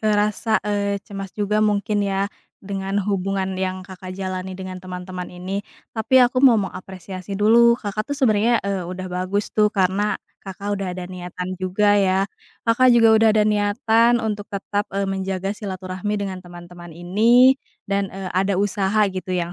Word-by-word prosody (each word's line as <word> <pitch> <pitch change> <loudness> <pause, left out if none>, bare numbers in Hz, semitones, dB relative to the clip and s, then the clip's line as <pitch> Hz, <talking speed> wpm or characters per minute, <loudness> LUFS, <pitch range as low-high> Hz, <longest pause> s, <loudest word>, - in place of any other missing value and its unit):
eee, 215 -1 +2
rasa, 215 +1 +1
eee, 200 -1 0
cemas 195 -2 -7
juga 210 +1 +1
mungkin 210 0 +1
ya, 200 0 -1 0.3
dengan 195 0 -3
hubungan 195 -1 -1
yang 185 0 -3
Kakak 185 -1 -9
jalani 185 -1 -4
dengan 185 -1 -7
teman-teman 180 0 -7
ini. 185 +3 -4 0.3
Tapi 225 +3 +1
aku 255 +1 +1
mau 255 -5 +7
mengapresiasi 190 -1 -5
dulu, 235 +3 +5
Kakak 215 +1 -4
tuh 285 - -2
sebenarnya, 230 -3 +3
eee, 190 -3 -2
udah 185 0 -5
bagus 185 +3 -2
tuh, 210 -1 +4
karena 200 +1 +1 0.2
Kakak 200 +1 -5
udah 190 - -2
ada 180 - -5
niatan 180 0 -6
juga, 205 +3 +2
ya. 190 0 +2 0.4
Kakak 240 +3 +4
juga 230 -1 +6
udah 225 - +6
ada 210 - +4
niatan 220 +3 +3
untuk 210 -1 -3
tetap, 205 +1 -3
eee, 200 - +1
menjaga 195 0 -2
silaturahmi 190 0 -4
dengan 185 -1 -5
teman-teman 175 -1 -12
ini 220 +10 +4 0.3
dan, 200 0 -1
eee, 190 -1 -7
ada 190 +1 +1
usaha 205 +1 +1
gitu 185 0 -6
yang 175 0 -2
195 Hz, 165 wpm, -22 LUFS, 185-210 Hz, 0.4 s, mau